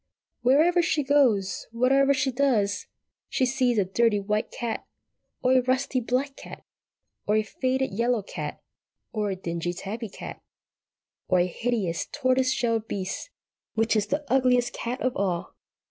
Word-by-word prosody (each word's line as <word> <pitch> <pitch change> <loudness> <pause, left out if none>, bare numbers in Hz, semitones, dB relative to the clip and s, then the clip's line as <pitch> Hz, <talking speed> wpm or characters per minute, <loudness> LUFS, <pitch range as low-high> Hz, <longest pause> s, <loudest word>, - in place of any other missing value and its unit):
Wherever 310 +8 +4
she 310 -3 +1
goes, 260 -9 +2
whatever 270 +4 +3
she 265 0 +1
does, 240 -7 +1 0.4
she 260 - +1
sees 250 -2 +1
a 200 - +3
dirty 210 +2 +2
white 210 +3 -1
cat, 235 -2 -4 0.6
or 255 - +3
a 260 0 +5
rusty 255 +1 0
black 255 +4 -1
cat, - - -11 0.6
or 210 - +3
a 215 - +3
faded 260 +5 -1
yellow 235 +1 +1
cat, - - -6 0.5
or 210 -2 -1
a 190 - -1
dingy 175 -1 -3
tabby 215 +5 -5
cat, - - -9 0.9
or 185 - +3
a 175 - +4
hideous 190 -3 -1
tortoise 255 0 +2
shell 230 -3 +1
beast, 200 - -5 0.5
which 225 0 +2
is 210 -1 +1
the 295 +6 -1
Ugliest 250 -2 +3
Cat 245 +3 -4
of 255 0 0
all. 185 -3 -1
240 Hz, 150 wpm, -26 LUFS, 205-260 Hz, 0.9 s, a